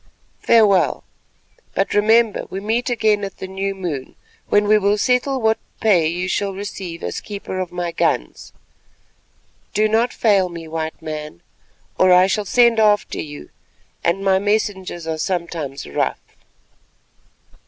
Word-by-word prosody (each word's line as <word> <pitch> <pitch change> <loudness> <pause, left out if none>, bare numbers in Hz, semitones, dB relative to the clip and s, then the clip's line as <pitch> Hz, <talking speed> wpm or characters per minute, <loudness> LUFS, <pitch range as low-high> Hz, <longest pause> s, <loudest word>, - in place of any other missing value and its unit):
Farewell, 210 -5 +4 0.7
but - - 0
remember 220 +1 +3
we 190 - -5
meet 225 +5 -1
again 215 -3 +1
at 195 -1 -6
the - - -6
new 195 +1 -3
moon, 165 -9 -5 0.3
when 205 0 +3
we 215 0 +5
will 205 +1 +2
settle 255 +4 +1
what 220 -1 +1 0.2
pay 185 -8 +3
you 175 +3 -2
shall 195 +1 -1
receive 190 -4 -6
as - - -4
keeper 200 -2 -6
of 185 -2 -3
my 175 -1 -3
guns. - - -1 1.2
Do 215 +1 +3
not 225 +3 +1
fail 200 -5 +2
me, 170 -1 -8
White 160 0 -5
Man, 150 - -6 0.6
or 185 0 +5
I 180 +1 +7
shall 205 +2 -1
send 235 +2 +4
after 210 -1 +2
you, 145 -1 -9 0.5
and 175 +4 0
my 190 -1 +4
messengers 200 -4 -1
are 160 -1 -3
sometimes 165 -6 -3
rough." 70 - -1
195 Hz, 145 wpm, -20 LUFS, 170-215 Hz, 1.2 s, I